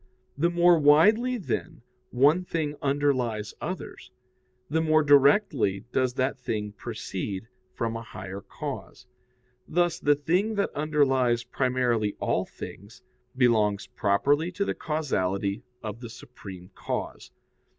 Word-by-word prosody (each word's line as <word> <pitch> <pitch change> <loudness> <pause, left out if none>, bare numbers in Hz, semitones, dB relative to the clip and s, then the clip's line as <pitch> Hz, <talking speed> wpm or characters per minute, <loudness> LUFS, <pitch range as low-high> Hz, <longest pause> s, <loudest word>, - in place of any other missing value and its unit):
The 170 +4 +2
more 175 -1 +5
widely, 215 - +5
then, 160 - -4 0.3
one 145 +8 +4
thing 155 -4 -2
underlies 130 -7 0
others, - - -6 0.6
the 160 +2 0
more 155 -1 +3
directly 145 - +4
does 130 -1 0
that 130 0 -1
thing 105 -4 -3
proceed 105 -2 -5 0.3
from 115 -1 -2
a 115 - -4
higher 95 -2 -8
cause. 140 +2 -7 0.6
Thus 175 0 +1
the 145 0 +3
thing 180 +9 0
that 200 - -1
underlies 135 -5 +2
primarily 125 -4 0
all - - 0
things, 100 +4 -10 0.3
belongs 110 -5 +3
properly 145 - +1
to 200 +3 -1
the - - -1
causality 100 - -1 0.2
of 110 0 -5
the 120 -2 -8
supreme 95 -6 -11
cause. - - -5
130 Hz, 120 wpm, -27 LUFS, 110-155 Hz, 0.6 s, more